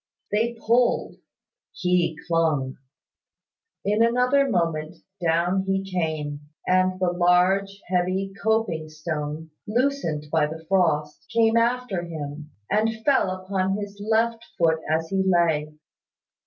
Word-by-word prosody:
They 230 +3 +1
pulled: 235 +2 +2 0.6
he 180 -3 +1
clung. 155 -6 +1 1.1
In 210 +2 +2
another 250 +4 +3
moment, 165 -4 -1 0.3
down 170 +3 +2
he 195 0 +1
came, 160 -6 -2 0.3
and 185 0 +2
the 180 -1 +2
large, 180 +3 +2
heavy 185 +2 0
coping 220 -8 0
stone, 155 0 -5 0.2
loosened 225 - 0
by 155 -2 +3
the 160 +1 -8
frost, 160 -6 +1
came 225 -1 +3
after 235 -4 +1
him, 150 -3 -7 0.2
and 220 +1 0
fell 275 -9 +3
upon 185 +1 -1
his 205 0 -7
left 225 +1 +1
foot 160 -1 +3
as 160 +1 0
he 195 -1 +1
lay. 165 -5 +2
185 Hz, 115 wpm, -24 LUFS, 160-210 Hz, 1.1 s, another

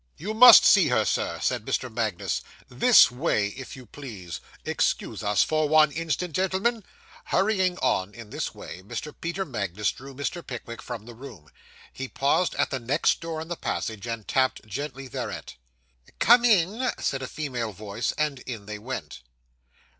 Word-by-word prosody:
'You 205 +8 -4
must 240 +2 +10
see - - +6
her. - - +2
Sir,' - - -1
said - - 0
Mr. - - -1
Magnus; - - -2 0.3
'this 245 - +6
way, 125 -6 0
if 130 +5 -9
you 130 -1 -12
please. 105 -9 -8 0.2
Excuse - - -1
us 105 -1 +3
for 155 -1 0
one 155 -1 +5
instant, 165 +2 -3
gentlemen.' 190 +5 0 0.4
Hurrying 190 -2 +1
on 95 +3 0
in 115 -3 -11
this - - -4
way, 90 - -9
Mr. 125 +10 -6
Peter 170 +3 -2
Magnus 105 - -2
drew 135 +1 -12
Mr. 145 +5 -4
Pickwick 115 -2 -7
from 115 -4 -7
the 120 - -10
room. 110 - -12 0.4
He 135 - -5
paused 140 +7 +1
at - - 0
the 130 - -2
next 130 +7 +1
door 165 -1 -4
in 160 - -7
the 175 - -4
passage, 110 -7 -4
and 115 -2 -5
tapped 130 -3 +1
gently 135 +4 -6
thereat. - - -6 0.6
'Come 240 +2 +6
in,' 220 +3 +3
said 135 - -2
a 130 - -4
female 125 -8 -4
voice. 105 +3 -3
And 150 -3 -1
in 115 -5 -7
they 105 0 -6
went. 105 - -6
135 Hz, 170 wpm, -26 LUFS, 110-170 Hz, 0.6 s, must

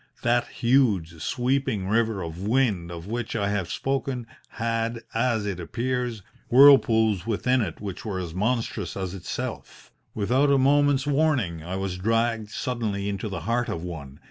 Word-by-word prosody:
That 120 0 +2
huge, 105 -11 +1
sweeping 125 -6 0
river 110 -2 +1
of 85 +1 -6
wind 105 -6 +1
of 85 -1 -7
which 115 +3 -4
I 100 -2 0
have 100 -4 -2
spoken 135 -2 -2 0.2
had, 115 0 -2
as 115 -2 +1
it 100 -3 -3
appears, 120 +3 -2 0.3
whirlpools 115 -7 +6
within 125 +3 +1
it 85 -7 -4
which 100 -3 -6
were 100 -4 -3
as 85 -3 -5
monstrous 105 -3 -1
as 95 -2 -3
itself. 95 -3 -6 0.2
Without 125 +7 +2
a 140 - +5
moment's 140 0 +3
warning 140 - +1
I 90 +3 -5
was 95 -1 -3
dragged 115 +1 0
suddenly 105 -5 -2
into 100 +2 -3
the 95 -4 -5
heart 120 +7 0
of 85 - -4
one. 75 -6 -8
110 Hz, 155 wpm, -25 LUFS, 95-125 Hz, 0.3 s, whirlpools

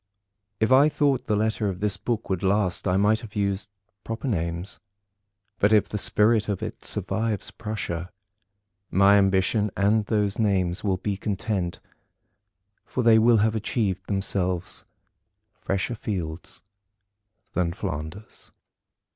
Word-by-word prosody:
If 110 +3 +1
I 140 +3 +7
thought 145 -3 +1
the 105 - +2
letter 110 0 0
of 90 -2 -5
this 105 -1 0
book 110 +3 -3
would 95 -2 -1
last, 100 -1 +1
I 90 0 +2
might 105 +2 +3
have 110 -1 -11
used 100 -1 -1 0.3
proper 115 +4 -4
names; 85 -3 -3 0.8
but 105 - +3
if 105 -2 +4
the 105 - -4
spirit 105 +1 +3
of 100 - -2
it - - -6
survives 110 -3 -2
Prussia, 100 -6 -4 0.8
my 100 +1 +5
ambition 100 +2 +2
and 105 +1 +2
those 105 -2 0
names 95 -5 +1
will 95 -3 +1
be 100 +1 -3
content; 95 -3 -2 1.0
for 125 - -3
they 115 -1 +6
will 115 +1 +5
have 110 - +1
achieved 105 -3 -2
themselves 95 -2 -2 0.7
fresher 95 +5 -2
fields 90 -8 -5 0.9
than 90 -2 0
Flanders. 85 +2 -7
100 Hz, 130 wpm, -25 LUFS, 95-110 Hz, 1.0 s, I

